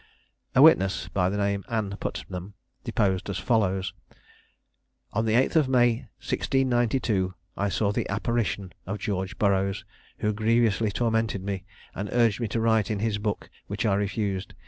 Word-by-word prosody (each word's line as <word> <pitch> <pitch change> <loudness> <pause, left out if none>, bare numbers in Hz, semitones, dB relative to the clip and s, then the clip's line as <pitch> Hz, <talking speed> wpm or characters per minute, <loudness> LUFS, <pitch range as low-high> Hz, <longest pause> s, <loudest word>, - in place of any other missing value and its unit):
A 130 - +7
witness, 95 -12 +5
by 90 -1 +1
name 100 0 0
Ann 110 -4 -1
Putnam, 90 +2 -5 0.3
deposed 95 -1 0
as 100 - -2
follows: 95 -5 +1 1.2
On 115 - +1
the 110 - +1
8th 130 +7 +3
of 150 -5 +4
May, 120 -3 +3
1692, 120 -7 0 0.2
I 100 0 0
saw 100 +3 +1
the - - -2
apparition 100 -2 -1
of 105 +3 -2
George 95 0 -3
Burroughs, 100 -1 +1 0.3
who 105 0 0
grievously 110 0 +2
tormented 110 -2 0
me, 95 -1 -4 0.3
and 100 +1 -4
urged 115 -3 +3
me 115 - 0
to 110 +3 -2
write 110 -2 +2
in 105 - 0
his 105 0 -1
book, 105 -1 -2 0.2
which 100 +3 -3
I 105 - +3
refused. 100 -1 -2
105 Hz, 150 wpm, -26 LUFS, 95-115 Hz, 1.2 s, A